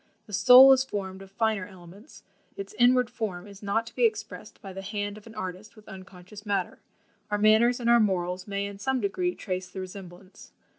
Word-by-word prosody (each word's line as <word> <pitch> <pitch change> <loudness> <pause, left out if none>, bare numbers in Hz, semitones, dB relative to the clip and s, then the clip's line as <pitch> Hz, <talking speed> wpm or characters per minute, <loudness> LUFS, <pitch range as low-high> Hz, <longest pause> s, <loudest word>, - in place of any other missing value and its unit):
The 210 - -14
soul 250 +6 +8
is 265 0 +2
formed 195 -6 -6
of 195 - -12
finer 215 -1 -1
elements, 190 - -15 0.3
its 195 0 -7
inward 250 0 +4
form 215 -7 -5
is 200 -1 -14
not 210 +3 -1
to - - -13
be 250 - 0
expressed 220 -1 -2
by 195 -1 -10
the 195 - -7
hand 205 0 -4
of 215 +1 -14
an 225 - -13
artist 185 +3 -7
with 215 -1 -18
unconscious 190 +1 -12
matter; 200 -4 -3 0.5
our 210 - 0
manners 220 +4 +4
and 235 - -3
our 235 0 +6
morals 180 -3 -1
may 200 0 -3
in 200 0 -8
some 265 +4 -1
degree 355 - -2
trace 185 -1 -5
the 190 - -8
resemblance. 185 0 -11
205 Hz, 200 wpm, -26 LUFS, 190-225 Hz, 0.5 s, soul